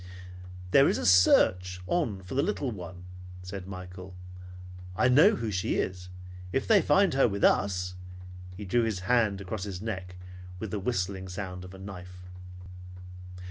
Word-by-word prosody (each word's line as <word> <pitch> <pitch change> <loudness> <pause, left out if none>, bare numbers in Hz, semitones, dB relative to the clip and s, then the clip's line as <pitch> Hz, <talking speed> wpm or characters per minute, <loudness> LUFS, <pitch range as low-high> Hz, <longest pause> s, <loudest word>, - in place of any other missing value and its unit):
"There 140 +6 +6
is - - 0
a - - -3
search 90 0 +4
on 110 - -1
for 90 - -8
the 135 - +2
little 145 -7 -2
one," 90 -3 -9 0.4
said 90 0 -7
Michael. 90 0 -9 0.8
"I 125 - +3
know 160 - +6
who 115 - -3
she 95 -2 -1
is. 90 -1 -3 0.4
If 135 - -1
they 210 -4 +6
find 195 -5 +3
her 135 -1 +4
with 100 -2 -4
us 90 -2 +2 0.3
" 90 0 -13
He 105 - -7
drew 120 +6 +2
his 110 -5 -2
hand 105 -2 +1
across 95 +1 -5
his 100 -3 -5
neck 95 -4 -5 0.4
with 100 +1 -6
the 105 - -2
whistling 95 -3 -2
sound 90 -1 -6
of 90 +1 -11
a - - -11
knife. 90 -2 -10
95 Hz, 165 wpm, -28 LUFS, 90-110 Hz, 0.8 s, There